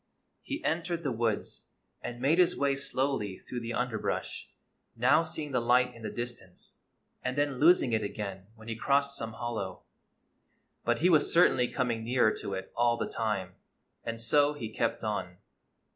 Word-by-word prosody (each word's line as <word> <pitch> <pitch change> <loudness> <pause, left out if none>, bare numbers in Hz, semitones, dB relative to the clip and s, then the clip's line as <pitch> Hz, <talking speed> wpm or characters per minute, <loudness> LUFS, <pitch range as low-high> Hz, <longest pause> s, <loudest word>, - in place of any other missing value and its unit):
He 290 +3 -5
entered 170 +1 -1
the 140 - 0
woods, 115 -2 -2 0.3
and 120 0 -6
made 145 +7 +3
his 180 - +4
way 140 -1 +2
slowly 135 -7 -1
through 125 - -6
the 115 0 -4
underbrush, 125 -3 -2 0.5
now 125 +7 +5
seeing 160 -2 -5
the 125 - +2
light 125 +1 +3
in 115 - -13
the 110 - -4
distance, 120 -7 -7 0.4
and 125 +2 -3
then 145 -3 0
losing 155 -6 +5
it 110 - +2
again 100 -2 -5
when 110 0 -14
he 115 - -3
crossed 140 +4 +2
some 115 -4 -4
hollow. 110 -6 -4 1.0
But 120 +3 +1
he 180 - +5
was 155 -3 +4
cer 175 +1 +7
tainly 125 -2 0
coming 120 -4 -1
nearer 120 -2 +3
to 100 - -4
it 95 - -7
all 120 0 +3
the - - -1
time, 100 -5 -2 0.5
and 115 0 -4
so 145 +5 +3
he 115 -7 -5
kept 115 - -1
on. 95 -4 -3
120 Hz, 175 wpm, -30 LUFS, 110-140 Hz, 1.0 s, cer